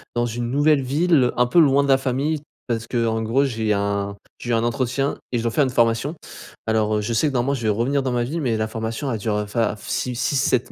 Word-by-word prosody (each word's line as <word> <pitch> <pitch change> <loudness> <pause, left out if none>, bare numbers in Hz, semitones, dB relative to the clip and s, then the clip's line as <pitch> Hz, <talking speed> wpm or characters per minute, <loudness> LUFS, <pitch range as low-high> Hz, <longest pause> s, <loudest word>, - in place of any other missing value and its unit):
Dans 120 - +1
une 120 0 -3
nouvelle 145 +1 +3
ville, 140 -1 +2
un 125 - +3
peu 145 +8 +3
loin 140 -3 +5
de 140 - -2
la 135 - +6
famille, 140 +4 -1 0.3
parce 115 -2 -2
qu'en 115 -2 0
gros 115 +5 +2
j'ai 110 -5 0
un, 100 0 -1 0.2
j'ai 120 - -4
eu - - +2
un 115 0 +2
entretien 130 +3 -1 0.2
et 120 - +2
je - - -4
dois 115 - 0
faire 140 +5 +2
une - - -1
formation. 120 +5 +1 0.5
Alors 110 -1 +1
heu, - - -2
je 105 - -3
sais 115 +7 +2
que 145 - -2
normalement, 130 +2 +1
je 120 -4 -4
vais 110 - +1
revenir 120 +7 +1
dans 130 -2 -2
ma 120 -1 +1
ville, 150 +8 -3
mais 120 -5 0
la 110 0 -1
formation 115 +5 -3
elle 110 - -2
dure 105 +1 -1
enfin 105 +1 -1
f 105 - -11
6-6-7 130 0 0
120 Hz, 250 wpm, -22 LUFS, 110-135 Hz, 0.5 s, la